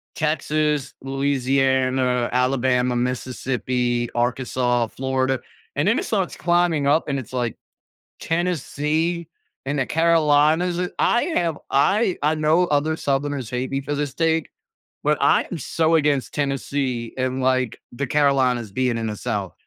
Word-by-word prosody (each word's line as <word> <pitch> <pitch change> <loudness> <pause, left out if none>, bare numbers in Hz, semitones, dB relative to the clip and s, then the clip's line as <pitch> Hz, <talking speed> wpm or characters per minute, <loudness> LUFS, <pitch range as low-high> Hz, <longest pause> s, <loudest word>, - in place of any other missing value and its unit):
Texas, 150 -2 0
Louisiana, 130 -2 +1
Alabama, 125 0 +1
Mississippi, 125 -1 -1
Arkansas, 120 -1 0
Florida, 130 +1 -1 0.4
and - - +1
then - - +3
it - - -3
starts - - -1
climbing 170 -4 +2
up, 155 +3 +2
and 140 -2 -1
it's 130 0 -10
like, 120 -3 -2 0.6
Tennessee 165 0 -1 0.4
and 145 +2 -1
the 130 - +1
Carolinas. 165 +2 +3 0.2
I 240 - +3
have 165 -3 0
I 190 +8 +2
I 150 +2 +3
know 155 +3 +3
other 150 0 +1
Southerners 140 -4 -2
hate 125 +1 -2
me 135 0 -1
for 145 +2 -4
this 145 -2 -2
take, 160 -1 +1 0.5
but 150 0 +2
I 140 - +4
am 175 - -3
so 160 +4 +1
against 145 -4 +1
Tennessee 135 -4 -2
and, 130 0 -1
like, 130 -2 +1
the 135 +3 -3
Carolinas 130 -6 +2
being 125 +2 0
in 115 - -2
the 105 - -3
South. 105 -6 -3
135 Hz, 135 wpm, -22 LUFS, 125-155 Hz, 0.6 s, I